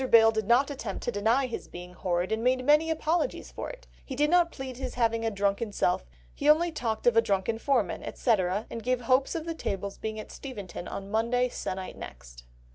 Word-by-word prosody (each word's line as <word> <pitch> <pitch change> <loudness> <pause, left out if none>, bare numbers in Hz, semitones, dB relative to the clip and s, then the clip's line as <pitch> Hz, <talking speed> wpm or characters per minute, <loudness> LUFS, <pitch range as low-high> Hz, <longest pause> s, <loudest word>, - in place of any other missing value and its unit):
Bayle 225 -1 +7
did 220 -2 -2
not 260 +5 +4
attempt 225 -8 -5
to 240 - -1
deny 230 +6 +2
his 245 - -5
being 180 +1 -9
horrid, 180 +1 -1
and 220 +1 0
made 255 0 +2
many 300 +3 +5
apologies 325 +7 -1
for - - -5
it; - - -10 0.2
he 265 - -6
did 295 +3 +2
not 350 -1 +4
plead 260 -2 -7
his 260 -1 -5
having 230 -1 +1
a 225 - +2
drunken 200 +1 0
self, 180 - 0 0.3
he 290 - -3 0.2
talked 230 -8 -3
only 240 - +7
of 225 - -3
a - - +8
drunken 205 +2 0
foreman, 240 -8 +1
etc., 205 -3 0
and 230 - -5
gave 250 +1 0
hopes 255 +5 +2
of 325 -1 -3
the 335 - -2
tables 200 - -4
being 220 0 -4
at 215 - -8
Steventon 205 -9 -7
on 200 0 -6
Monday 240 +3 +2
se'nnight 185 -5 -5
next." - - -10
230 Hz, 210 wpm, -28 LUFS, 200-260 Hz, 0.3 s, a